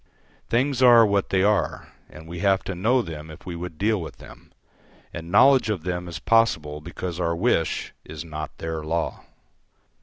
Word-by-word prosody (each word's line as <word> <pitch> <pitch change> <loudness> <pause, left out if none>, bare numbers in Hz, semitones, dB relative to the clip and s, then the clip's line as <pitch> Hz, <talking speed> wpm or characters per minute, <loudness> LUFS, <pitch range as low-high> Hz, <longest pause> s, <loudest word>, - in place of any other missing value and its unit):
Things 130 +2 +1
are 120 -2 +8
what 100 -1 0
they 95 -1 +2
are, 105 0 0 0.2
and 80 +1 -13
we 85 +1 -7
have 95 -1 +2
to 95 - -4
know 115 +8 +2
them 80 -3 -8
if 80 - -12
we 90 - -5
would 85 -2 -7
deal 105 0 +1
with 80 - -8
them, - - -15 0.6
and 85 0 -7
knowledge 130 +4 +5
of 95 -7 -2
them 90 0 -3
is 85 - -6
possible 80 -10 +1
because 85 +2 -6
our 85 -1 0
wish 85 -3 0
is 80 +1 -8
not 75 -1 -7
their 80 -1 -4
law. 80 +2 -2
90 Hz, 180 wpm, -24 LUFS, 80-105 Hz, 0.6 s, are